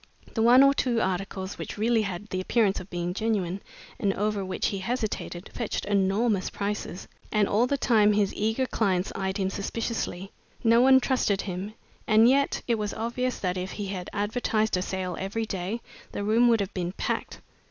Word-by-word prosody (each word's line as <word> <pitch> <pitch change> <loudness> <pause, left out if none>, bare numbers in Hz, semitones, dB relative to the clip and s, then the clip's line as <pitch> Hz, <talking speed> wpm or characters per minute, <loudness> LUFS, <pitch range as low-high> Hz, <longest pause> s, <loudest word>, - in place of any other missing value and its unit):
The 225 - 0
one 245 +4 +7
or 275 0 +6
two 245 -4 +1
articles 190 0 -3
which - - -6
really 225 +1 +2
had 200 0 -4
the 185 - -2
appearance 205 0 +2
of 185 - -10
being 175 0 -3
genuine, 200 -3 -1 0.4
and 200 - +2
over 205 0 -1
which 185 0 -2
he 200 - -3
hesitated, 215 -4 -3
fetched 235 - -3
enormous 200 +1 +1
prices, 200 -3 -4 0.2
and 210 -2 +3
all 230 +5 +2
the 280 - 0
time 215 -5 +4
his 205 -1 +1
eager 220 +5 0
clients 195 -6 0
eyed 190 0 -2
him 190 -1 0
suspiciously. 200 -3 -3 0.3
No 230 0 +5
one 265 +1 +7
trusted 240 -7 +1
him, 195 +3 -5 0.3
and 220 +1 +6
yet 275 +2 +2
it 230 -2 +1
was 210 -1 -3
obvious 245 +3 -2
that 185 -1 -1
if 185 +1 -4
he 205 - -4
had 185 -2 -5
advertised 215 +1 0
a 180 - 0
sale 185 -1 -3
every 205 +4 -2
day, 195 +3 -3 0.3
the 205 - -3
room 225 +4 +4
would 230 -3 +4
have 195 - -4
been 180 -1 -3
packed. - - -3
205 Hz, 185 wpm, -27 LUFS, 190-230 Hz, 0.4 s, one